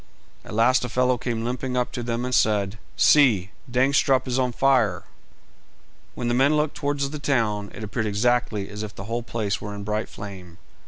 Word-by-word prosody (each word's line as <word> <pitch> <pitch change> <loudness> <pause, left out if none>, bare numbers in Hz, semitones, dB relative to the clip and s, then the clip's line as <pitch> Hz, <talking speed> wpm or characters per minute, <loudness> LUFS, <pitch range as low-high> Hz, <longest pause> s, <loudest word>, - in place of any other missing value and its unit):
At - - -8
last 125 +4 +4
a 125 - -3
fellow 125 +1 +1
came 115 -2 -3
limping 125 +1 -2
up 125 - 0
to 120 - -4
them 120 +1 -2
and 125 - -3
said 105 -3 +2 0.2
"See, 110 -11 +4 0.2
Dangstrup 130 +1 +2
is 125 +1 0
on 125 -1 +1
fire!" 120 -7 +2 1.1
When 120 - -3
the 120 - +1
men 140 +5 +3
looked 150 0 0
towards 145 -1 -1
the 150 - -5
town, 110 -8 0
it 110 - -9
appeared 110 +2 -2
exactly 105 -1 0
as 105 0 -7
if 110 -1 -7
the 95 - -7
whole 115 +4 -3
place 110 -4 -3
were 105 0 -6
in 100 - -6
a - - -7
bright 105 +1 -2
flame. 95 -4 -10
120 Hz, 200 wpm, -24 LUFS, 105-130 Hz, 1.1 s, last